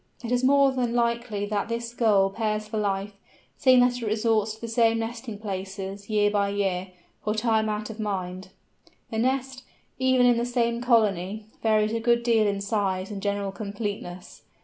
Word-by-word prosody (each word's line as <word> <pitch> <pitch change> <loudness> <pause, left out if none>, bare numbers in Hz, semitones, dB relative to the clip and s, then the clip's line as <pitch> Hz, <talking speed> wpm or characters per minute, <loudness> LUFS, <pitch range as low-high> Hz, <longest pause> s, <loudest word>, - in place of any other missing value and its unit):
It 235 - -4
is 250 0 +1
more 275 +1 +5
than 245 -2 -1
likely 235 -3 0
that 205 +1 -2
this 235 0 -3
Gull 205 -5 +3
pairs 215 0 -2
for 215 0 -3
life, 200 0 -1 0.4
seeing 255 -3 +5
that 245 0 +2
it - - -3
resorts 215 0 +1
to 220 - -21
the 230 - -4
same 230 0 +3
nesting 225 -1 -5
places, 195 0 -6
year 205 -1 +3
by 200 -1 +1
year, 195 -2 -1 0.4
for 210 0 -1
time 220 -1 +1
out 215 +1 -3
of 220 - -11
mind. 185 -3 -3 0.6
The 220 - -1
nest, 260 +1 -1 0.4
even 260 -1 +4
in 245 -1 +5
the 235 - 0
same 235 -1 0
colony, 215 -4 +1 0.2
varies 215 -1 +2
a 230 - 0
good 235 +1 +2
deal 225 -3 +3
in 200 -1 -1
size 200 -2 -1
and 200 -1 -5
general 200 -1 -1
completeness. 200 -3 -6
215 Hz, 180 wpm, -26 LUFS, 200-235 Hz, 0.6 s, more